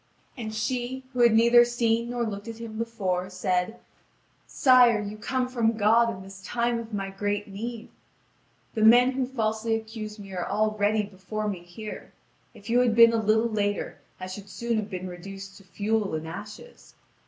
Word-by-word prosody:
And 225 -5 -5
she, 245 +4 -3
who 250 - -4
had 235 -2 +6
neither 235 +1 +7
seen 235 -1 0
nor 240 -1 -1
looked 205 0 -5
at 225 -1 -6
him 230 -2 -7
before, 190 -6 -2
said: 185 +4 -1 0.7
"Sire, 250 -5 +5
you 210 0 -5
come 250 +4 -2
from 230 -3 0
God 225 +2 +4
in 190 -4 -6
this 195 0 -12
time 235 +3 -1
of 230 0 -8
my 195 -2 -3
great 205 +1 -2
need! 225 +3 -6 0.8
The 220 - -2
men 245 +4 +7
who 260 -1 -1
falsely 225 -3 -1
accuse 220 -1 -6
me 195 -2 -10
are 180 -1 -2
all 215 +3 +1
ready 215 0 +1
before 205 +2 -5
me 195 -4 -3
here; 175 +5 -9 0.4
if 205 - -14
you 240 +1 +3
had 240 -3 +3
been 230 0 +8
a 225 - +1
little 220 +2 +3
later 205 -2 -2 0.2
I 185 - -5
should 195 +2 -8
soon 235 +4 -2
have 215 -1 -3
been 185 -1 -5
reduced 195 +2 -9
to 195 - -16
fuel 205 0 -1
and 155 +1 -5
ashes. 210 - -10
215 Hz, 185 wpm, -26 LUFS, 200-235 Hz, 0.8 s, been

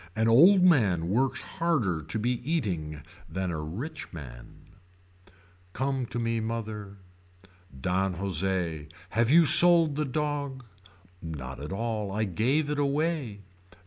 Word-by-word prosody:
An 110 +1 +1
old 175 - +6
man 100 - +3
works 130 +5 0
harder 125 - -1
to 80 +8 -4
be 120 +3 0
eating 85 - -3 0.3
than 95 -1 -3
a 80 -2 -4
rich 140 - -7
one. 60 -8 -12 1.1
Come 135 -2 -2
to 115 - -6
me 115 -1 -1
mother. 110 -3 -5 0.8
Don 95 +4 -1
Jose. 90 -4 -2 0.2
Have 115 +1 +1
you 165 +3 +6
sold 170 -2 +7
the 150 - 0
dog. 140 -2 -3 0.6
Not 70 -5 -7
at 75 +4 -7
all 110 -1 -3
I 105 +2 -1
gave 130 - 0
it 150 - -2
away. 140 -6 -1
115 Hz, 130 wpm, -27 LUFS, 90-145 Hz, 1.1 s, sold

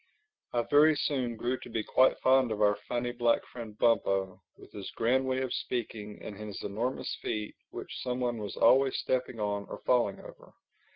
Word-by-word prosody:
I 120 -1 +1
very 150 +3 +5
soon 130 -5 -1
grew 125 +3 -2
to - - -10
be 115 -2 -2
quite 130 +4 +4
fond 130 -2 +4
of 105 - -2
our 105 -1 +4
funny 120 0 -1
black 120 -1 +1
friend 115 -4 -9
Bumpo, 95 -5 +1 0.2
with - - -15
his 100 -2 -7
grand 130 +3 +2
way 130 0 0
of 130 -2 -2
speaking 105 -4 -4
and 105 - -7
his 105 -1 -7
enormous 115 +6 -2
feet 105 -2 -3 0.2
which - - -7
some 125 0 -2
one 120 -2 -1
was 105 -1 -6
always 135 0 +5
stepping 125 -2 -1
on 100 -1 -2
or - - -6
falling 120 -6 +2
over. - - -14
120 Hz, 185 wpm, -30 LUFS, 105-130 Hz, 0.2 s, very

